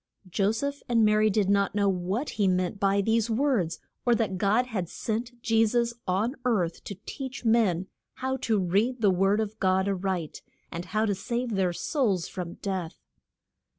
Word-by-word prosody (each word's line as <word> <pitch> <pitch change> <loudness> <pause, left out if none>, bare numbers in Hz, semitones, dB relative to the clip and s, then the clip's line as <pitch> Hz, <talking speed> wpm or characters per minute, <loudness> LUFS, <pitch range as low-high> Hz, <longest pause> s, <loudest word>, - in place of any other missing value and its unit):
Jo 195 +3 +1
seph 280 +5 -3
and 230 -2 +4
Ma 210 - +4
ry 215 0 +4
did 205 -1 +1
not 200 0 +2
know 200 -1 +2
what 190 +8 -1
he 205 -3 +1
meant 185 +1 0
by 200 0 +3
these 225 +2 +1
words, 225 - +1 0.3
or 240 -1 +4
that 195 -5 -1
God 215 +6 +3
had 195 -9 -3
sent 235 +2 -4
Je 225 -1 +4
sus 235 +1 +1
on 205 +8 0
earth 190 -9 0
to 200 - -5
teach 265 -2 -6
men 215 -6 +3 0.3
how 260 0 -2
to 225 -4 0
read 205 +7 +1
the 205 -3 +5
word 195 +3 +2
of 220 0 -3
God 190 0 +2
a 200 - +2
right, 185 -4 -3 0.3
and 170 +1 -5
how 215 +3 0
to 205 - +1
save 235 +5 -3
their 190 -3 +1
souls 195 - 0
from 175 -2 -6
death. 185 -4 -3
205 Hz, 185 wpm, -27 LUFS, 190-230 Hz, 0.3 s, the